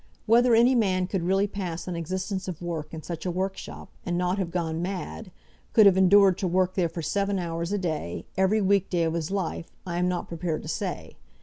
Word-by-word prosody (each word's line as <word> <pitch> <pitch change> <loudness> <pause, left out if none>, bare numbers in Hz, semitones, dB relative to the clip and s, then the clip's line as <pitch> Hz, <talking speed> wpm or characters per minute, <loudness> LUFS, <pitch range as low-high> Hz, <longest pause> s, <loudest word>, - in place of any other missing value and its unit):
Whether 235 +2 +5
any 240 +3 +5
man 190 -6 +2
could 190 0 -2
really 190 +3 +2
pass 185 -5 -5
an 180 - -3
existence 185 +3 -3
of 180 -4 -5
work 165 -3 -4
in 160 -1 -7
such 170 -2 -6
a 185 - -2
workshop, 190 +2 -4
and 175 -1 -2
not 180 +2 0
have 185 -3 -1
gone 165 -2 -2
mad, 190 +2 -5 0.4
could 215 - +7
have 195 -2 +7
endured 190 0 +5
to 190 - 0
work 185 +1 +1
there 180 -3 +1
for 165 0 -6
seven 200 +5 0
hours 170 0 -3
a 205 - +1
day, 155 - -3
every 190 +3 +2
week 195 -1 +2
day 175 -2 +1
of 165 0 0
his 165 -2 -2
life, 190 -4 -3 0.2
I 175 -1 -2
am 180 - +2
not 180 -1 -2
prepared 165 -2 -3
to - - -8
say. - - -4
185 Hz, 220 wpm, -26 LUFS, 170-195 Hz, 0.4 s, could